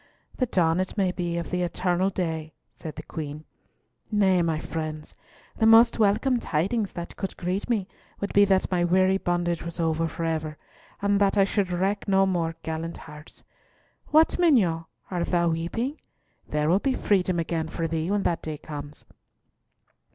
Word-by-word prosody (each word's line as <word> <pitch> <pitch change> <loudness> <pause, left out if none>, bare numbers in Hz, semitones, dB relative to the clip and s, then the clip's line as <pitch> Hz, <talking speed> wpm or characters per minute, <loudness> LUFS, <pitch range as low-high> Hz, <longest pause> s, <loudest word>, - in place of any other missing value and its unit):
"The 255 - +1
dawn, 170 -4 +2
it 185 +3 -3
may 190 -3 +2
be, 175 -2 -3
of 170 - -4
the 180 -1 0
eternal 180 +1 0
day," 160 -5 -3 0.2
said 155 - -8
the - - -7
Queen. 150 -1 -6 0.7
"Nay, 190 -4 +3
my 165 -2 0
friends, 155 -1 -5 0.4
the 220 - +3
most 230 +1 +6
welcome 220 +5 +3
tidings 200 +5 -1
that 170 0 -7
could 195 - -5
greet 185 +4 -2
me 210 -6 0 0.3
would 200 - -3
be 205 - +6
that 190 -1 +1
my 175 -1 +2
weary 185 +2 +3
bondage 175 -1 -1
was 170 +1 -7
over 165 0 +1
for 165 +1 -5
ever, 155 -2 -2 0.5
and 200 0 +2
that 200 +1 +3
I 195 - +6
should 195 -1 0
wreck 195 +4 -1
no 195 -1 +4
more 170 -3 -1
gallant 160 +1 -4
hearts. 150 0 -13 0.6
What, 315 +3 +4
mignonne, 200 - +3 0.3
art 175 -2 -1
thou 170 -1 +2
weeping? 200 - -2 0.5
There 150 0 0
will 180 +5 +4
be 265 +3 0
freedom 185 -3 +1
again 165 -1 -2
for 165 0 -2
thee 165 +1 -2
when 205 0 +1
that 170 - 0
day 155 -1 -5
comes." 145 -1 -8
175 Hz, 175 wpm, -26 LUFS, 165-195 Hz, 0.7 s, most